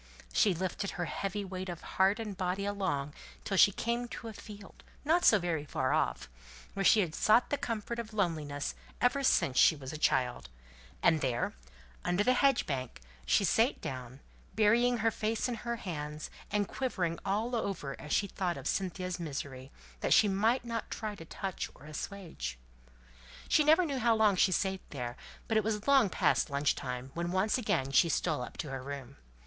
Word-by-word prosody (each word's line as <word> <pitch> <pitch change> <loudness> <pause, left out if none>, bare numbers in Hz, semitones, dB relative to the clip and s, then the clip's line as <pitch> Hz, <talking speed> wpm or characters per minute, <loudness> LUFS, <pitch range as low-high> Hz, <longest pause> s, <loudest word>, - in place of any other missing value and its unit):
She 200 -4 +4
lifted 185 +3 -2
her 175 - -1
heavy 200 +3 -3
weight 185 0 -5
of 175 -2 -6
heart 195 +3 +2
and 210 -3 -4
body 185 +2 -2
along 185 -9 -2 0.3
till 195 - -2
she 200 - +7
came 235 +4 -2
to 230 -1 -7
a - - -8
field, 205 -1 -12 0.2
not 335 +4 +3
so 210 - +7
very 170 -5 -1
far 135 -2 -1
off, 155 - 0 0.5
where 195 - -2
she 215 - +6
had 170 -5 -2
sought 220 +7 +3
the - - +3
comfort 230 +1 -3
of 230 -1 -5
loneliness 155 -8 -1 0.3
ever 250 +3 +2
since 140 - +3
she 160 - +6
was 140 0 -8
a 155 - -6
child; 125 - +1 0.5
and 160 -2 +4
there, 125 -3 0 0.5
under 180 +3 +1
the 255 - +4
hedge 275 0 +3
bank, 130 -4 -4 0.3
she - - +4
sate - - +2
down, 130 +1 -7 0.3
burying 235 +3 +4
her 225 0 +2
face 220 +2 -1
in 245 - -2
her 235 +1 -3
hands, 150 -7 -5 0.2
and 205 -1 0
quivering 180 -10 -2
all 215 +5 -1
over 185 -11 -3
as 150 - -8
she 205 - +3
thought 185 -3 -2
of - - -5
Cynthia's 185 -1 -2
misery, 140 -4 -5 0.3
which - - +3
she 210 - +6
might 220 +6 +2
not 230 -1 -4
try 215 -2 -4
to 165 -5 -10
touch 190 +3 -4
or 140 - -15
assuage. 155 - -6 0.9
She 305 - +4
never 315 +4 +5
knew 280 -4 -2
how 235 -1 +3
long 215 -3 +4
she 185 +1 +4
sate 190 +1 0
there, 125 -4 -5 0.3
but 225 - +2
it 215 - +3
was 210 0 -2
long 270 -7 +5
past 170 - +2
lunch 140 0 +1
time 125 0 -5
when 170 +1 -2
once 195 +7 +1
again 135 - 0
she 165 +5 +5
stole 155 -4 0
up 125 - -7
to 150 -5 -4
her 135 -1 -4
room. 140 -1 -7
190 Hz, 190 wpm, -31 LUFS, 150-220 Hz, 0.9 s, she